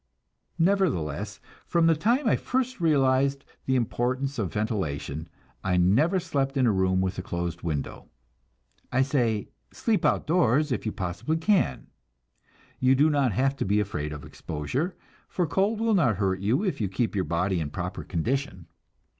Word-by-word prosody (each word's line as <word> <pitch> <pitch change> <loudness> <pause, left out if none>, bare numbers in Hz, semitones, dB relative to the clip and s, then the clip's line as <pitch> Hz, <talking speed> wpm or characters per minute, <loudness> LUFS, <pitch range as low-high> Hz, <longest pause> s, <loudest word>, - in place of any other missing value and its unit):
Nevertheless, 110 - 0 0.3
from 170 -1 +3
the 165 0 +5
time 235 - +1
I - - +4
first 255 -3 -2
realized 140 -3 +2 0.2
the 130 - +2
importance 130 +2 -1
of 95 -6 -1
ventilation 85 - -3 0.3
I 90 -1 +1
never 130 - +3
slept 140 -4 -1
in 130 - +3
a 115 - +4
room 95 -1 +2
with 95 0 -2
a - - -1
closed 85 -1 -4
window. 75 -5 -4 0.8
I 130 +1 +3
say, 120 -7 0 0.2
sleep 220 -3 0
outdoors 150 -3 +2
if 120 - -2
you - - 0
possibly 95 - -2
can. 160 - +1 0.9
You 130 +1 +4
do 150 +4 +4
not 140 -4 +2
have 135 +6 +1
to - - -1
be 100 +2 +2
afraid 75 -8 -2
of 75 -1 -7
exposure, 125 - -3 0.3
for 180 - 0
cold 195 +8 +1
will 225 0 +2
not 145 - +3
hurt 95 -1 0
you 110 - +1
if 185 - -1
you 100 - 0
keep 110 +5 -1
your 95 -3 0
body 90 +2 0
in 75 -3 -3
proper 90 +4 -5
condition. 115 - -2
125 Hz, 165 wpm, -26 LUFS, 95-155 Hz, 0.9 s, the